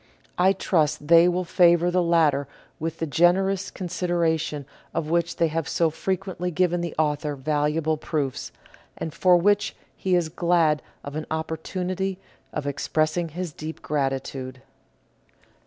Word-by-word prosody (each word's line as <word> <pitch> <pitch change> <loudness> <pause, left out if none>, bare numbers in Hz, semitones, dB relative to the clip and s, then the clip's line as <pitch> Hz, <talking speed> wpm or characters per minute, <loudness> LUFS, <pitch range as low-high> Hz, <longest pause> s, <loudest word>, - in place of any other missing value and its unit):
I 190 +2 +5
trust 155 -5 0
they 170 +1 +8
will 180 +1 +1
favour 175 0 +4
the 180 0 +2
latter 160 -5 +2 0.3
with 165 +1 -3
the 165 - -2
generous 185 +5 +2
considera 175 -2 0
tion 150 -2 -4 0.3
of 160 -1 -2
which 170 0 +1
they 165 - +2
have 160 -2 -2
so 165 -2 +2
frequently 185 +1 -3
given 175 0 +1
the 170 -1 -4
author 150 -1 0
valuable 150 +3 0
proofs, 145 -4 -3 0.5
and 160 - -5
for 180 -1 +5
which 205 +3 +2 0.2
he 185 -1 0
is 170 -3 +1
glad 165 -3 +2 0.2
of 140 +1 -7
an 155 - -4
opportunity 180 +4 -3 0.3
of 150 - -4
expressing 155 +4 0
his 175 0 -5
deep 155 +2 -7
gratitude. 135 -2 -3
165 Hz, 140 wpm, -25 LUFS, 150-180 Hz, 0.5 s, they